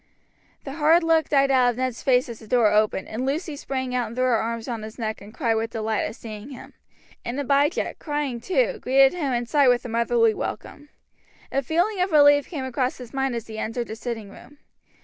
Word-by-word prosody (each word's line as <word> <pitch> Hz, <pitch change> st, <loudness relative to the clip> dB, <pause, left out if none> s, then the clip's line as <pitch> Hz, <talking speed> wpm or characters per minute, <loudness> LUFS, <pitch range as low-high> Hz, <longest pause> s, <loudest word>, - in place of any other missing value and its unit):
The 275 Hz, -, -7 dB
hard 325 Hz, +3 st, +5 dB
look 325 Hz, -1 st, +2 dB
died 275 Hz, -1 st, +3 dB
out 255 Hz, -2 st, +4 dB
of 240 Hz, -, -3 dB
Ned's 255 Hz, -2 st, -2 dB
face 255 Hz, -1 st, +2 dB
as 235 Hz, -2 st, -8 dB
the 220 Hz, -, -14 dB
door 230 Hz, -2 st, +3 dB
opened, 210 Hz, -2 st, +1 dB
and 225 Hz, +4 st, -4 dB
Lucy 295 Hz, +4 st, -2 dB
sprang 260 Hz, -2 st, -4 dB
out 245 Hz, -2 st, 0 dB
and 225 Hz, -, -9 dB
threw 255 Hz, 0 st, +1 dB
her 250 Hz, -2 st, +3 dB
arms 230 Hz, 0 st, -3 dB
round 230 Hz, -3 st, -4 dB
his 215 Hz, 0 st, -9 dB
neck 220 Hz, -2 st, -4 dB
and 205 Hz, +1 st, -12 dB
cried 230 Hz, -1 st, 0 dB
with 225 Hz, 0 st, -1 dB
delight 220 Hz, -1 st, -2 dB
at 215 Hz, -, -5 dB
seeing 215 Hz, +1 st, -9 dB
him; 260 Hz, -3 st, -11 dB, 0.5 s
and 245 Hz, +4 st, -4 dB
Abijah, 285 Hz, +3 st, +1 dB
crying 290 Hz, -6 st, -3 dB
too, -, -, 0 dB
greeted 270 Hz, +1 st, +4 dB
him 305 Hz, -7 st, -2 dB
inside 250 Hz, +4 st, +2 dB
with 245 Hz, 0 st, +3 dB
a -, -, -5 dB
motherly 230 Hz, 0 st, +2 dB
welcome. 290 Hz, +6 st, -6 dB, 0.6 s
A 275 Hz, -, +1 dB
feeling 350 Hz, -, 0 dB
of 365 Hz, 0 st, 0 dB
relief 290 Hz, -1 st, +5 dB
came 285 Hz, -7 st, -4 dB
across 255 Hz, 0 st, -2 dB
his 245 Hz, -3 st, -11 dB
mind 270 Hz, -2 st, -1 dB
as 230 Hz, -1 st, -4 dB
he 220 Hz, -1 st, -8 dB
entered 235 Hz, +2 st, -3 dB
the 220 Hz, -, -5 dB
sitting 225 Hz, -3 st, -6 dB
room. 290 Hz, +7 st, -15 dB
250 Hz, 220 wpm, -24 LUFS, 230-285 Hz, 0.6 s, hard